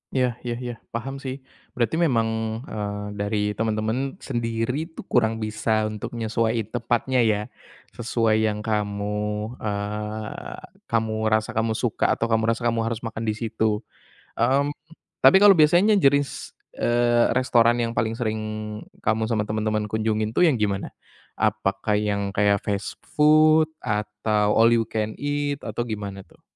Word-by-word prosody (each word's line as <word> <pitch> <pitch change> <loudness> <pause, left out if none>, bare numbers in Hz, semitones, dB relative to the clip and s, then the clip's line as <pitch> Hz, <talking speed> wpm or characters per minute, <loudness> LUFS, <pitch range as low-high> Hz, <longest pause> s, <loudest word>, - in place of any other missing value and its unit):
Iya 130 -1 +3 0.2
iya 120 -1 -2
iya 120 - -3 0.2
paham 135 +4 -4
sih. 130 -1 -4 0.4
Berarti 120 +3 +1
memang, 115 -7 +2 0.4
eee, 105 -4 -4 0.2
dari 105 +1 -1 0.2
temen-temen 110 +5 -1
sendiri 120 +5 -2
tuh 160 - -10
kurang 115 -2 +2
bisa 110 0 0
untuk 105 -1 -4
nyesuaiin 115 0 0
tepatnya 120 +1 +1
ya, 110 -3 +2 0.5
sesuai 115 -2 +1
yang 105 -1 0
kamu, 105 -1 -1 0.5
eee, 105 +1 -4 0.3
kamu 110 -1 0
rasa 110 +1 +1
kamu 110 -1 0
suka 120 -4 0
atau - - 0
kamu 110 -1 +1
rasa 115 +1 -1
kamu 115 -1 +1
harus 115 +1 -5
makan 110 0 -5
di 110 -1 -1
situ. 110 -2 -1 0.5
Mmm, 135 +5 +2 0.5
tapi 190 - +7
kalau 205 - +10
biasanya 180 +7 +5
jenis, 140 -3 +1 0.2
eee, 120 0 +3
restoran 120 -2 +4
yang 115 - -1
paling 115 -1 -1
sering 110 -2 -2 0.6
kamu 110 0 +1
sama 110 -2 0
temen-temen 110 0 -2
kunjungin 110 0 0
tuh 175 +9 +4
yang 150 - +3
gimana? 100 -3 -2 0.4
Apakah 105 -1 0
yang 100 -1 -1
kayak 100 0 +2
fast 100 -1 -3
food 155 +1 +5 0.2
atau 105 -1 0
all 115 +1 +6
you 115 -1 +2
can 110 -1 -2
eat 145 0 -1
atau 120 - -2
gimana 100 -4 -5
tuh? - - -25
110 Hz, 145 wpm, -24 LUFS, 105-120 Hz, 0.6 s, kalau